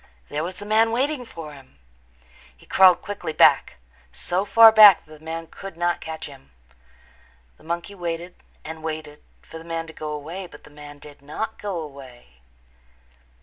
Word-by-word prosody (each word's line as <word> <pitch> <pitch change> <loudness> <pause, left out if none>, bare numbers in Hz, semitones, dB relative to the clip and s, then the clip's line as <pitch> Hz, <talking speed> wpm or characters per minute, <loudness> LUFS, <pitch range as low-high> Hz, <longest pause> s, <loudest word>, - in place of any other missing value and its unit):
There 150 +1 -3
was 180 +2 -5
the 205 - -10
man 220 +2 +3
waiting 260 +2 -1
for 160 -8 -10
him! 135 - -17 0.8
He - - -20
crawled 185 -2 +5
quickly 190 -6 -5
back, - - +4 0.4
so 185 +3 -2
far 225 +1 +8
back 210 -4 +8
that 155 - -21
the - - -22
man 165 +1 -5
could 190 +2 -11
not 175 0 -1
catch 160 0 -6
him. 70 - -13 1.1
The - - -20
monkey 170 +4 -5
waited 175 -1 -5 0.3
and 160 +1 -8
waited 155 -2 -6 0.2
for 165 - -11
the - - -12
man 165 0 -4
to 160 - -12
go 155 0 -6
away, 160 +6 -6
but - - -16
the - - -16
man 145 0 -12
did 145 0 -15
not 220 +10 -6
go 200 -4 -3
away. 130 - -12
165 Hz, 175 wpm, -23 LUFS, 150-190 Hz, 1.1 s, far